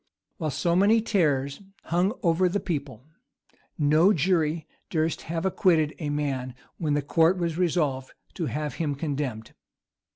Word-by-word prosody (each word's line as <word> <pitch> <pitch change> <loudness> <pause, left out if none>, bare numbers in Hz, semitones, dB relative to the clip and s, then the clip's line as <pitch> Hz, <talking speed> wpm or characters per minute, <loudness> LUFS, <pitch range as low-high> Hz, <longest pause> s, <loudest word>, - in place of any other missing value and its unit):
While 160 -4 -2
so 170 +5 0
many 205 +5 +5
terrors 150 -10 0 0.2
hung 180 +5 +1
over 175 +1 +3
the 205 +3 0
people, 140 - -4 0.7
no 155 +6 +4
jury 160 -2 +1 0.2
durst 160 0 0
have 165 +1 -2
acquitted 165 -5 +2
a 150 -3 -3
man 135 -4 -2 0.2
when 150 -3 0
the 145 - 0
court 165 +5 +3
was 170 -2 -1
resolved 155 -7 0 0.2
to 170 -5 -3
have 150 0 -3
him 145 -3 -1
condemned. 140 -7 -4
155 Hz, 140 wpm, -26 LUFS, 145-175 Hz, 0.7 s, many